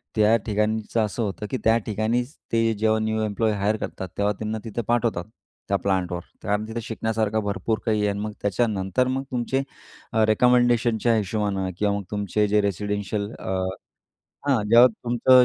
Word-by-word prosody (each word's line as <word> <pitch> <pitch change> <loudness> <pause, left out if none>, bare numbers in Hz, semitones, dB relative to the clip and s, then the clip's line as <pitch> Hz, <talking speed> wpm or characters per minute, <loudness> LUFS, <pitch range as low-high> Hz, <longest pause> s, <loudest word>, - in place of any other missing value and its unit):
त्या 110 +1 +5
ठिकाणचं 110 +1 0
असं 110 +3 -3
होतं 105 +1 -3
की 130 - 0
त्या 115 +1 +5
ठिकाणीच, 115 +6 -1 0.2
ते 115 0 +2
जेव्हा 110 0 +2
न्यू 110 0 0
एम्प्लॉयी 110 +1 0
हायर 100 +2 +1
करतात 95 - -5
तेव्हा 100 +1 +2
त्यांना 110 0 -2
तिथं 115 +1 -3
पाठवतात, 115 -7 +1 0.4
त्या 100 - +2
प्लांटवर. 90 -3 -1 0.2
कारण 105 +1 -1
तिथं 115 +1 -4
शिकण्यासारखं 110 -1 -1
भरपूर 105 +2 -1
काही 110 -2 +2
आहे 105 - +2
आणि 100 0 -2
मग 105 0 -3
त्याच्यानंतर 105 +3 +1
मग 130 +1 -1
तुमचे 125 +2 0 0.7
रिकमेंडेशनच्या 120 0 +3
हिशोबानं 100 -2 -1
किंवा 105 -1 +1
मग 100 - -5
तुमचे 105 0 0
जे 105 +1 +3
रेसिडेन्शियल 100 +1 -2
अ - - -6 1.0
हां, 130 -7 +3
जेव्हा 120 +2 +8
तुमचं 120 +2 +4
110 Hz, 160 wpm, -24 LUFS, 105-115 Hz, 1.0 s, जेव्हा